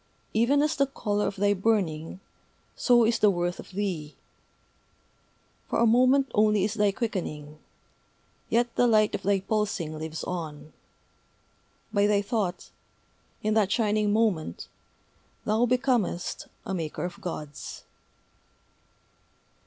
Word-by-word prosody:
Even 260 +6 +3
as 305 +1 +1
the 275 -1 +2
color 210 -6 -1
of - - -3
thy 205 +1 +2
burning, 185 -5 -1 0.5
so 240 -2 +4
is 230 +1 +1
the 210 - +5
worth 175 -1 -1
of - - -10
thee. 180 -6 -3 1.5
For - - 0
a 235 - +4
moment 255 +3 +4
only 210 -2 +3
is 205 +1 0
thy 210 -2 +2
quickening; 155 -9 -4 0.9
yet 240 +1 +1
the 245 - +4
light 215 -2 +4
of - - -2
thy 200 0 +1
pulsing 200 -6 -1
lives 160 0 -5
on: 155 -4 -6 1.2
by 205 -1 +3
thy 205 -1 +2
thought, 200 -4 -2 0.7
in 215 0 +1
that 210 -3 +2
shining 210 -2 +2
moment, 205 - 0 0.8
thou 220 +3 +2
becomest 245 -8 0 0.2
a 195 - -3
Maker 165 -2 -3
of 175 - -7
Gods." 150 -4 -7
205 Hz, 125 wpm, -27 LUFS, 175-225 Hz, 1.5 s, the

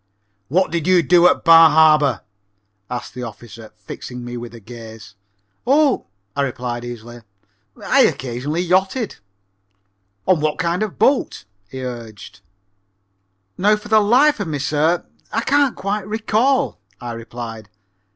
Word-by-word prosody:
"What 185 +6 +1
did 170 -1 -2
you 180 -2 +4
do 175 +3 +5
at - - +1
Bar 165 -1 +8
Harbor?" 150 -7 +4 0.7
asked 125 -2 -6
the 125 - -7
officer, 115 -1 -10
fixing 120 +3 -9
me 120 0 -6
with 120 0 -7
his 115 -3 -13
gaze. 115 -2 -11 0.5
"Oh," 285 0 +3 0.3
I 140 - 0
replied 125 -3 -3
easily, 120 0 -9 0.6
"I - - +1
occasionally 135 +6 -2
yachted." 190 +6 0 1.1
"On 185 -4 +3
what 150 0 -1
kind 170 +2 -1
of 215 - 0
a - - -20
boat?" 270 - +1 0.2
he 130 -1 -7
urged. 115 -4 -8 1.2
"Now 210 +3 +4
for 210 0 -10
the 220 0 +5
life 255 +7 +4
of 200 - -3
me, 150 -2 -3
sir, 155 +4 0 0.3
I 225 - 0
can't 280 0 +2
quite 200 0 -3
recall," 225 +5 0 0.2
I 120 - -6
replied. 115 -2 -8
150 Hz, 140 wpm, -19 LUFS, 120-195 Hz, 1.2 s, Bar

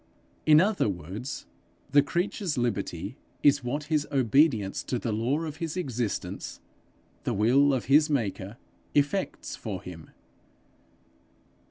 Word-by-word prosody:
In 155 0 +8
other 195 - +2
words 95 - -5 0.5
the 145 +1 +7
creature's 175 +2 -2
liberty 120 -4 -2 0.3
is 145 -1 +5
what 140 +5 -2
his 150 -1 0
obedience 130 -5 +3
to 125 - -1
the 115 -1 -2
law 120 +8 0
of 155 -1 -5
his 165 +1 -4
existence, 125 - -3 0.6
the - - -1
will 130 +8 +4
of 130 -3 -1
his 150 +4 +5
maker, 110 -6 -2 0.4
effects 145 +7 0
for 105 -5 -5
him. 85 -4 -10
135 Hz, 125 wpm, -28 LUFS, 110-150 Hz, 0.6 s, In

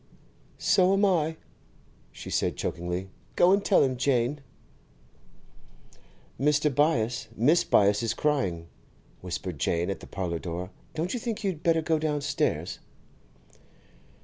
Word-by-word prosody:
'So 185 0 +3
am 200 +1 +3
I,' 160 -4 +1 0.7
she - - -9
said - - 0
chokingly. 90 +2 -3 0.3
'Go 175 - +5
and 200 +1 +3
tell 200 - +4
him, 130 -2 0
Jane.' 130 +2 +1 2.0
'Mr. 150 +1 +2
Byass, 125 -6 +1
Mrs. 155 +9 +3
Byass 100 +1 +4
is 115 -1 -1
crying,' 110 - 0 0.6
whispered 90 -3 -5
Jane 85 +5 0
at 95 - -5
the - - -12
parlour 90 -4 -3
door. 90 +2 -5 0.2
'Don't 165 +3 -2
you 245 - -2
think 225 -1 -4
you'd 185 -6 -2
better, 165 -2 +2
go 160 0 +1
downstairs? 145 -3 -1
140 Hz, 125 wpm, -27 LUFS, 95-165 Hz, 2.0 s, Go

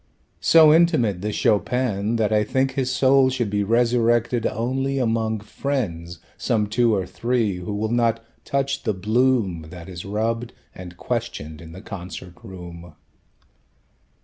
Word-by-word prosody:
"So 160 -2 +6
intimate, 155 - +3
this 105 +1 -3
Chopin, 115 -1 +1
that 110 -1 +1
I 105 0 +3
think 130 +5 0
his 130 -1 -1
soul 130 +1 +4
Should 120 -5 -2
be 105 0 0
resurrected 120 +1 +2
only 135 +4 -2
among 110 -3 0
friends 100 -8 -4 0.2
Some 110 -4 0
two 115 +1 +2
or 95 -2 -1
three, 115 -3 -1
who 90 +3 -5
will 110 +2 -2
not 115 -1 +1 0.2
touch 140 -1 -1
the 110 -4 -1
bloom 105 -5 +1
That 85 -1 -10
is 90 -2 -7
rubbed 115 +4 -2 0.2
and 90 -1 -10
questioned 100 -11 -4
in 80 -1 -11
the 95 +5 -11
concert 90 -3 -8
room." 85 -3 -10
110 Hz, 145 wpm, -23 LUFS, 95-125 Hz, 0.2 s, So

